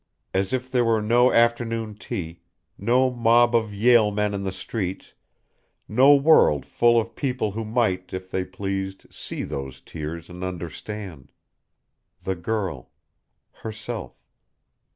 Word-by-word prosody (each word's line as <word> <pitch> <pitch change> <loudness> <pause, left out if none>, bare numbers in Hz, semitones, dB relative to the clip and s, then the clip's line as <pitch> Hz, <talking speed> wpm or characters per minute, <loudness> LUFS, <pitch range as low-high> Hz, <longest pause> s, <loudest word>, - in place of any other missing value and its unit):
As 95 0 0
if 130 0 -2
there 125 -2 +3
were 115 -1 +2
no 120 +4 +4
afternoon 115 -2 +1
tea, 85 -5 -6 0.3
no 125 +5 +2
mob 120 0 +4
of 110 -2 +1
Yale 110 +1 +4
men 105 0 -1
in 100 - -3
the 95 -1 -2
streets, 95 0 -5 0.7
no 130 +6 +6
world 140 - +5
full 120 0 +3
of 115 0 -4
people 125 -6 -1
who 110 +3 -4
might, 110 -5 0
if 95 0 -6
they 95 - 0
pleased, 95 0 -4
see - - -5
those 65 -1 -6
tears 80 +3 -7
and 90 +1 -9
understand. 90 -1 -7 0.9
The 95 - -1
girl. 90 - -3 0.6
Herself. 110 -1 -7
105 Hz, 130 wpm, -24 LUFS, 95-120 Hz, 0.9 s, no